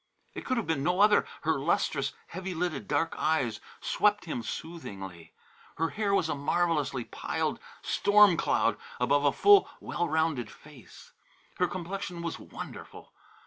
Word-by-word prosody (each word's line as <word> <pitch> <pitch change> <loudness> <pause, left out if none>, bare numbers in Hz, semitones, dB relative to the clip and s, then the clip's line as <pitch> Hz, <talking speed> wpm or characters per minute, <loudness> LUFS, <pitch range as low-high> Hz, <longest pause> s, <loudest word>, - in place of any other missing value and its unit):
It - - -7
could 255 - 0
have 230 - -1
been 160 -4 0
no 180 +5 +1
other; 210 +1 +5 0.2
her - - +1
lustrous, - - 0 0.2
heavy 185 -1 -5
lidded 165 -4 -2
dark 155 +3 0
eyes 125 -9 +1 0.2
swept 210 -1 +2
him 155 -7 -3
soothingly. 95 - -7 0.5
Her 165 +1 +1
hair 210 -2 -1
was 185 -5 +2
a - - -1
marvellously 145 -3 0
piled - - -3 0.2
storm 205 -2 +5
cloud - - +1 0.2
above 145 0 +2
a 140 - +5
full, 405 0 +6
well 175 -1 -2
rounded 155 -7 0
face. 145 -2 -15 0.5
Her 180 - +3
complexion 180 0 -5
was 170 - -4
wonderful. - - -10
165 Hz, 145 wpm, -29 LUFS, 145-185 Hz, 0.5 s, full